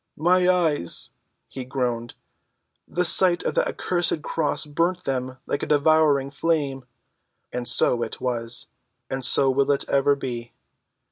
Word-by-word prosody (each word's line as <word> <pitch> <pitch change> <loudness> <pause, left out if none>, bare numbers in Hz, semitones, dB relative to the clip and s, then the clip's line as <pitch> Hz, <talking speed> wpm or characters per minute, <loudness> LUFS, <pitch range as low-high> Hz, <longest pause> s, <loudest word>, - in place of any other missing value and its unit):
"My 180 +3 +3
eyes," 160 - +1 0.4
he 130 - -7
groaned. 125 -3 -3 0.7
"The 180 0 -1
sight 175 0 +4
of - - -1
that - - +1
accursed 175 -3 -1
cross 150 -2 -1
burnt 170 +5 -1
them 130 -1 -3
like - - -2
a - - -3
devouring 150 -2 +3
flame." 140 -3 -1 0.7
And 125 -1 -4
so 120 0 +2
it 115 - -4
was. 120 -2 -1 0.5
And 135 0 -3
so 135 +2 +4
will 135 +1 +1
it 140 - -1
ever 140 +1 +3
be. 120 -4 -6
140 Hz, 140 wpm, -24 LUFS, 125-165 Hz, 0.7 s, sight